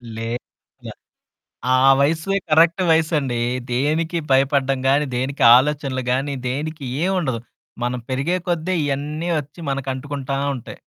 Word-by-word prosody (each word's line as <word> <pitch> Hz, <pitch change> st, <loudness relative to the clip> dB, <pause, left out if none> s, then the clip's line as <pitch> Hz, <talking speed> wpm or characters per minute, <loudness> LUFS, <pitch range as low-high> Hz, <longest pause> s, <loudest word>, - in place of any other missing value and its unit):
లేదుగ. 115 Hz, +2 st, -3 dB, 1.4 s
ఆ -, -, +6 dB, 0.2 s
వయస్సుయే 160 Hz, +7 st, +1 dB
కరక్ట్ 165 Hz, +4 st, +4 dB
వయసండీ. 150 Hz, -7 st, +1 dB, 0.3 s
దేనికి 155 Hz, +6 st, 0 dB
భయపడడం 135 Hz, 0 st, +2 dB
గానీ, 140 Hz, +2 st, +3 dB
దేనికి 130 Hz, +3 st, -2 dB
ఆలోచనలు 135 Hz, -1 st, 0 dB
గానీ, 140 Hz, +2 st, -1 dB
దేనికి 150 Hz, +2 st, -4 dB, 0.2 s
ఏవుండదు. 170 Hz, -, 0 dB, 0.4 s
మనం 125 Hz, +1 st, -1 dB
పెరిగే 140 Hz, +8 st, 0 dB
కొద్దే 175 Hz, +2 st, 0 dB
ఇయన్నీ 150 Hz, +4 st, -2 dB
ఒచ్చి 145 Hz, +4 st, -14 dB
మనకంటుకుంటా 135 Hz, +1 st, -3 dB, 0.2 s
ఉంటాయి. 120 Hz, -, -9 dB
140 Hz, 110 wpm, -21 LUFS, 130-160 Hz, 1.4 s, ఆ